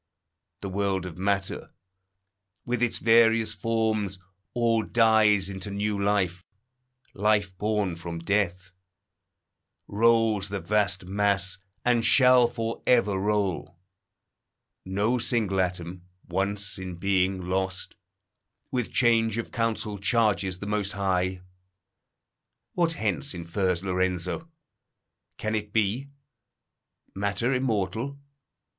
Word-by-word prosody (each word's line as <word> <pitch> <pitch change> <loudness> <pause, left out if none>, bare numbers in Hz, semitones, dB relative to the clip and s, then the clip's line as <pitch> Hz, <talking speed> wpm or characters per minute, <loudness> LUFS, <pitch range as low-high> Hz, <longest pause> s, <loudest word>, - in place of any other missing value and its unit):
The 100 - -4
world 95 -1 -1
of 90 -1 -8
matter, 100 0 -2 0.9
with 125 -1 -2
its 120 -2 +1
various 115 -1 +4
forms, 110 -4 -1 0.4
All 115 -2 +2
dies 110 -3 +4
into 95 0 -5
new 100 0 -2
life. 95 -3 0 0.7
Life 105 -2 +1
born 105 -4 0
from 85 0 -6
death 90 0 -1 1.2
Rolls 110 -2 +2
the 100 0 -3
vast 100 -2 0
mass, 100 0 0 0.3
and 120 -2 +3
shall 125 +1 +6
for 115 -1 -4
ever 110 -5 +4
roll. 95 -3 -1 1.1
No 105 +6 0
single 105 -6 +1
atom, 90 0 -4 0.3
once 100 +2 -1
in 95 -1 -6
being, 95 +1 +1
lost, 95 +1 -3 0.8
With 125 -3 -2
change 115 -2 +3
of 115 - -4
counsel 110 -3 -2
charges 100 -3 +1
the 100 - -7
Most 105 -1 -1
High. 95 -2 -1 1.3
What 170 -2 +1
hence 100 - -2
infers 90 +1 -1
Lorenzo? 95 - -2 0.9
Can 110 0 -3
it 105 -1 -3
be? 110 +6 0 1.0
Matter 100 +6 -1
immortal? 120 +1 -1
100 Hz, 105 wpm, -26 LUFS, 95-115 Hz, 1.3 s, shall